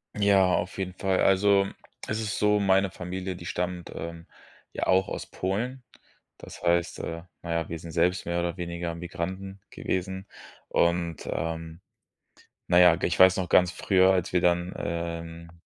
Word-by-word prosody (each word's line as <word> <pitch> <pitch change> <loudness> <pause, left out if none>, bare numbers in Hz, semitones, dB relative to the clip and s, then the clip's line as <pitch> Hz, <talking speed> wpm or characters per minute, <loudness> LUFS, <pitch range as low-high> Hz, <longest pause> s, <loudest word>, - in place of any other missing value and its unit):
Ja, 100 -3 +4
auf 95 - -3
jeden 95 -1 -3
Fall. 95 0 0
Also 100 0 +4 0.4
es 110 0 -2
ist 105 -2 -3
so, 105 0 +3
meine 95 -1 +3
Familie, 90 0 -5
die 85 -1 -10
stammt, 90 -1 -3
ähm, 85 0 -7 0.5
ja - - -3
auch 95 +1 +3
aus - - -5
Polen. 120 +8 -3 0.5
Das - - -11
heißt, 85 -1 +1
äh, 85 0 -5 0.2
na 85 - -6
ja, 85 -2 -1
wir 85 - -4
sind 85 0 -9
selbst 90 +3 +1
mehr 85 0 -1
oder 85 +1 -2
weniger 85 -1 -4
Migranten 95 +3 -5
gewesen. 95 +1 -3 0.4
Und, 85 -1 0
ähm, 80 +1 -4 0.9
na 90 0 +5
ja, 90 -2 +7
g - - -1
ich 85 - -1
weiß 95 0 +7
noch, 90 -2 -2
ganz 90 0 +4
früher, 95 0 +4
als 90 -2 -1
wir 90 - +3
dann, 85 +1 +1
ähm, 85 0 -5
90 Hz, 170 wpm, -27 LUFS, 85-95 Hz, 0.9 s, ja